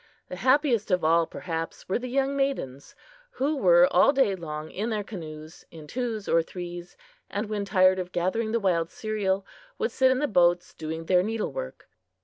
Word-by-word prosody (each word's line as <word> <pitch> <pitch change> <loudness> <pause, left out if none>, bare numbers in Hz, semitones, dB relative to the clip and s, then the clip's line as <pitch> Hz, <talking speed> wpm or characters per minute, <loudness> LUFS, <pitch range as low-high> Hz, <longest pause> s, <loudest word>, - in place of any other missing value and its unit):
The 180 - -6
happiest 255 - +2
of 180 -3 +1
all, 165 +1 +3
perhaps, 165 -2 -5
were 190 - 0
the 250 0 -6
young 275 +2 0
maidens, 270 - -3 0.4
who 295 - 0
were 175 -8 +5
all - - +5
day 270 -8 +2
long 155 -3 -6
in 215 +5 -3
their 215 -2 -2
canoes, 155 -5 -9
in 160 -2 -11
twos 225 +2 -4
or 165 - +4
threes, 175 +1 -8 0.3
and 205 +2 -3
when 205 -1 -3
tired 185 -2 +4
of 180 0 -5
gathering 200 +6 -1
the 230 - +1
wild 170 -5 +1
cereal, 200 -3 -2 0.3
would 460 - -1
sit 260 -1 +3
in 260 - +2
the 295 +3 0
boats 175 -4 +2
doing 160 +1 -6
their 180 +1 +4
needle 220 +3 -2
work. - - -7
190 Hz, 185 wpm, -26 LUFS, 170-235 Hz, 0.4 s, were